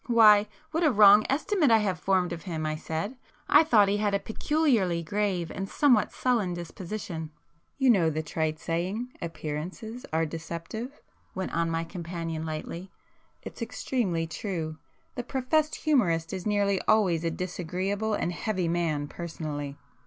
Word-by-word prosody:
"Why, 215 -3 +7 0.2
what 325 - 0
a 310 - +5
wrong 210 -1 +7
estimate 315 +2 +2
I 225 - +7
have 195 -5 -1
formed 185 -2 +1
of 165 - -6
him!" 160 -4 -4
I 155 0 -1
said—"I 200 - 0
thought 220 -10 +5
he 200 +1 +1
had 205 -1 +1
a - - +1
peculiarly 220 - +1
grave 185 -1 -1
and 195 0 -5
somewhat 255 -7 +3
sullen 225 -8 0
disposition." 175 -1 -6 0.5
"You 265 -2 +5
know 175 -7 +4
the 155 0 -2
trite 155 0 -2
saying—appearances 175 +2 -4
are 160 +1 +1
deceptive?" 170 - -6 0.4
went 190 -1 -3
on 170 0 +1
my 165 0 -1
companion 165 -2 -5
lightly—"It's 170 +9 -9
extremely 220 -7 -1
true. 160 -2 -4 0.3
The 245 - -3
professed 285 +5 0
humourist 175 - +1
is 190 +1 -4
nearly 200 -2 +2
always 185 -7 +3
a 165 - +1
disagreeable 185 +5 -2
and 175 - -1
heavy 185 -2 -1
man 165 -4 0
personally. 150 -4 -5
185 Hz, 145 wpm, -28 LUFS, 165-220 Hz, 0.5 s, Why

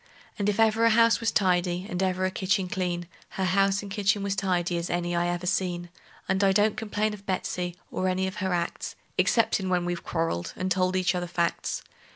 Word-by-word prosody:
And 205 0 +1
if 205 - -1
ever 225 0 +4
a 230 - +6
house 230 +1 +5
was 230 -1 +1
tidy, 180 -2 +1
and 180 -4 -3
ever 185 0 +1
a 185 - 0
kitchen 190 0 0
clean, 175 -2 -2 0.3
Her 190 - 0
house 195 +2 +2
and 200 - -8
kitchen 205 0 +1
was 200 -1 -1
tidy 180 -3 0
as 170 0 -3
any 175 0 -1
I 170 0 +1
ever 175 0 -2
seen; 175 -2 -1 0.4
And 190 +1 +1
I 195 - +5
don't 210 +2 +3
complain 215 -1 -1
of 200 0 -11
Betsey, 180 -2 -2 0.2
or 185 - -1
any 185 +1 +1
of 190 +2 -4
her 190 -1 -1
acts, 170 -1 -2 0.2
Exceptin' 210 -4 +2
when 180 -1 +1
we've 175 -1 -3
quarreled, 165 - -2
and 185 0 -3
told 185 0 +2
each 185 -1 +2
other 175 -1 -2
facts. 170 0 -1
185 Hz, 210 wpm, -27 LUFS, 175-200 Hz, 0.4 s, a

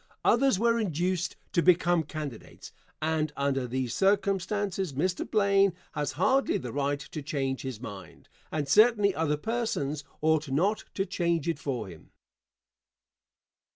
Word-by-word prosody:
Others 265 -3 +4
were 230 +2 +2
induced 180 -2 -1 0.2
to 170 - +2
become 175 -1 +4
candidates, 150 -5 -8 0.3
and 155 -1 0
under 135 -2 0
these 125 -1 -2
circumstances 195 -2 0
Mr. 175 +7 -1
Blaine 200 -2 +3 0.2
has 150 -2 -2
hardly 270 +1 +2
the 125 -3 -6
right 140 0 0
to 150 - -7
change 135 -2 -2
his 130 -5 -5
mind, 105 -5 -10 0.2
and 150 -2 -2
certainly 210 - +5
other 150 -3 0
persons 155 - -2 0.2
ought 155 -1 +1
not 185 +11 +1
to 195 - 0
change 170 -5 -1
it 165 -3 -1
for 125 -8 -3
him. 85 -4 -13
160 Hz, 135 wpm, -28 LUFS, 140-195 Hz, 0.3 s, certainly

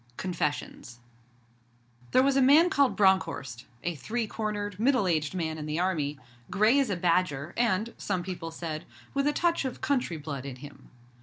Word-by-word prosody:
CONFESSIONS 150 -8 -3 1.1
There 255 - +4
was 275 0 +3
a 275 - +4
man 305 +7 +6
called 280 -2 +3
Bronckhorst 165 - +1 0.2
a 175 - -1
three 225 - -3
cornered, 205 -2 -4
middle 255 -2 +3
aged 155 -1 0
man 160 -3 -2
in 150 - -5
the 155 +2 -2
Army 155 -6 0 0.3
grey 215 +7 +4
as 270 -4 +1
a 200 - 0
badger, 170 -4 0
and, 230 -1 +1
some 185 -3 -2
people 175 -2 -5
said, 165 -1 -5 0.3
with 275 +1 +1
a - - +4
touch 340 +1 +1
of 260 -2 -4
country 250 - 0
blood 145 -3 -6
in 135 -2 -6
him. 140 +3 -13
185 Hz, 170 wpm, -28 LUFS, 155-240 Hz, 1.1 s, man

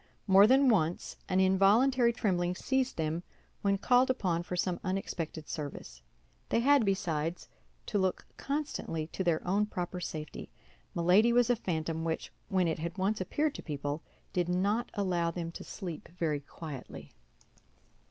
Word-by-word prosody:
More 195 +1 +7
than 265 +3 +5
once 175 -8 +1
an 185 0 +2
involuntary 220 +7 +4
trembling 180 -6 0
seized 265 +5 0
them 160 +1 -1 0.4
when 200 -1 +2
called 250 +5 +4
upon 185 -10 0
for 180 +1 -5
some 180 0 0
unexpected 170 -4 -3
service. 135 - -6 0.5
They 230 - +2
had, 280 0 +5
besides, 170 -4 -1 0.4
to 205 - 0
look 190 -1 0
constantly 280 - -3
to 180 +4 -4
their 170 -1 0
own 205 +3 +2
proper 180 -2 -4
safety; 155 -3 -6 0.5
Milady 185 +7 +5
was 245 0 +4
a - - +4
phantom 165 -6 -2
which, 165 -1 -3 0.2
when 185 -2 +2
it 160 - -1
had 170 +3 -4
once 195 +2 0
appeared 295 - 0
to - - -7
people, 145 0 -4 0.3
did 175 -1 0
not 200 +6 +1
allow 180 -4 +1
them 170 0 -4
to - - -8
sleep 175 -6 -7
very 155 -4 0
quietly. 145 -1 -9
185 Hz, 150 wpm, -31 LUFS, 165-215 Hz, 0.5 s, More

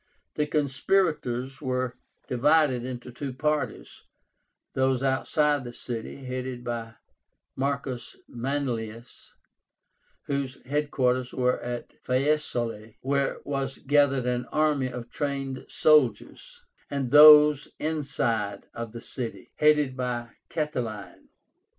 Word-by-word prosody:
The 150 - 0
conspirators 140 -3 0
were 130 -2 -1 0.3
divided 135 0 +3
into 125 0 -6
two 135 +3 -5
parties; 150 +3 -2 0.7
those 130 0 +1
outside 145 +3 +2
of 140 - -8
the 120 - -7
city, 120 +3 -6
headed 125 -1 -4
by 115 -2 -4 0.6
Marcus 135 -2 -3
Manlius, 120 -3 -4 0.9
whose 140 -2 -2
head 145 +2 -1
quarters 125 -1 0
were 125 0 +1
at 120 0 -6
Faesulae 135 +4 +2 0.5
(Fiesole), 110 0 -17
where 140 +1 0
was 135 -1 -2
gathered 140 -2 +2
an 125 0 -1
army 150 -4 +1
of 120 -1 -7
trained 135 -2 -3
soldiers; 155 - +2 0.3
and 135 -3 -2
those 150 0 +9
inside 135 -9 -1
of 115 -1 -6
the 115 - -7
city, 120 -3 -6
headed 150 -3 +3
by 120 -2 -3 0.2
Catiline. 125 -10 -4
130 Hz, 110 wpm, -27 LUFS, 125-145 Hz, 0.9 s, those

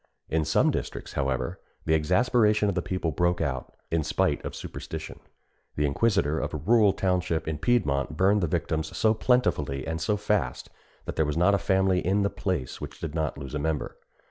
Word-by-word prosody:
In 80 -1 +1
some 80 - +3
districts, - - -5
however, 65 -1 -1 0.3
the 80 - +2
exasperation 105 +6 +3
of - - 0
the 90 - -1
people 90 -3 -2
broke 85 +3 +1
out, 65 -5 -2 0.2
in 80 -1 +1
spite - - 0
of - - -5
superstition. - - -7 0.6
The 75 - +1
inquisitor 80 0 +1
of 75 +1 -3
a - - -1
rural 105 +6 +4
township 90 -4 0
in 80 -2 -2
Piedmont 75 - +1
burned 100 +3 +4
the 85 - +1
victims 80 -1 -2
so 110 -1 +4
plentifully 75 - +1
and 80 0 -3
so 105 +7 +1
fast, 100 -11 -1 0.3
that - - -5
there 80 - +3
was 75 - -2
not 90 +4 +4
a 100 - +3
family 95 0 +2
in 100 +3 +1
the 100 - 0
place 90 -11 -3
which - - -7
did 80 -3 -5
not 80 -2 -2
lose 70 0 -7
a 75 - -1
member. 80 0 -2
85 Hz, 195 wpm, -27 LUFS, 75-100 Hz, 0.6 s, rural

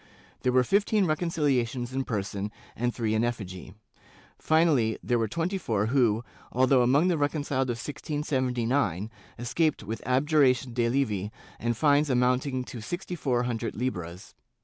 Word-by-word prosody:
There 125 - +2
were 130 0 +4
fifteen 200 - +2
reconciliations 140 -7 0
in 135 0 -1
person 100 -1 -3 0.2
and 120 +2 0
three 115 -3 -1
in 110 +1 +2
effigy. 95 -5 -4 0.6
Finally 155 -9 +3
there 120 -1 +1
were 115 - +1
twenty 170 - -2
four 110 - 0
who, 120 -4 +3 0.3
although 130 +1 +4
among 135 +8 +4
the 175 -4 +1
reconciled 145 -3 0
of 120 - -1
1679, 125 - -1 0.3
escaped 145 +4 0
with 110 +2 -5
abjuration 130 -1 +2
de 120 -1 +1
levi 110 -7 0 0.3
and 120 0 -1
fines 145 +1 +3
amounting 125 +1 +1
to 120 -2 -8
sixty 175 - -5
four 125 -6 0
hundred 120 -2 -3
hbras. 95 -5 -4
125 Hz, 145 wpm, -27 LUFS, 115-145 Hz, 0.6 s, were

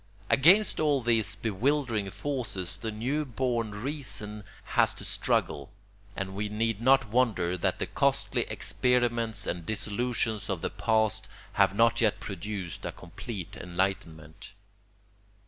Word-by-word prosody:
Against 185 +10 +5
all 145 -3 +2
these 115 -1 +2
bewildering 115 0 0
forces 100 -9 -2
the 110 +2 -4
new 125 +8 -1
born 120 -4 -1
reason 105 -5 -4 0.2
has - - +2
to - - -9
struggle; - - 0 0.5
and 95 0 -4
we 105 +2 -2
need 110 0 -1
not 130 -2 +4
wonder 105 -7 +2
that 90 - 0
the - - -1
costly - - +1
experiments 120 -3 0
and 85 0 -3
disillusions 110 +1 -1
of 95 -4 -1
the - - -2
past 110 -2 +1 0.3
have 100 -1 +3
not 115 +3 +4
yet 110 -3 +2
produced 95 -2 -5
a - - -3
complete 95 +1 -7
enlightenment. 85 -3 -3
110 Hz, 130 wpm, -29 LUFS, 95-125 Hz, 0.5 s, Against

